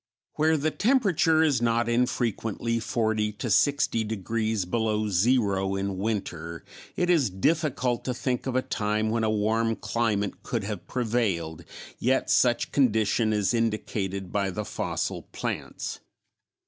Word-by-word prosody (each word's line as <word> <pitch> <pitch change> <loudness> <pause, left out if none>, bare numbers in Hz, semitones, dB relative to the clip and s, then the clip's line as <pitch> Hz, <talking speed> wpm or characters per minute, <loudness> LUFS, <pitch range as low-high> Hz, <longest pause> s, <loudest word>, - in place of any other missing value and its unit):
Where 160 +1 +2
the 155 +2 0
temperature 190 - +3
is 140 -7 +2
not 115 0 +2
infrequently 115 -1 0
forty 110 -1 0
to 110 +2 -4
sixty 140 0 +3
degrees 110 -1 -1
below 110 +1 0
zero 100 -2 +2
in 95 -1 -2
winter, 90 -6 -3 0.3
it 175 - +1
is 150 - +3
difficult 125 - 0
to 125 - -1
think 125 0 -2
of 130 - -2
a 130 - +2
time 110 0 -1
when 115 0 0
a 110 - +2
warm 110 +2 +1
climate 105 -2 -1
could 115 -4 -3
have 100 -3 -5
prevailed, 100 -10 -1 0.4
yet 130 +2 +1
such 120 -1 +3
condition 110 -4 +2
is 105 +1 +1
indicated 105 -4 -2
by 100 -1 0
the 105 +3 -4
fossil - - -3
plants. - - -4
110 Hz, 135 wpm, -27 LUFS, 105-125 Hz, 0.4 s, temperature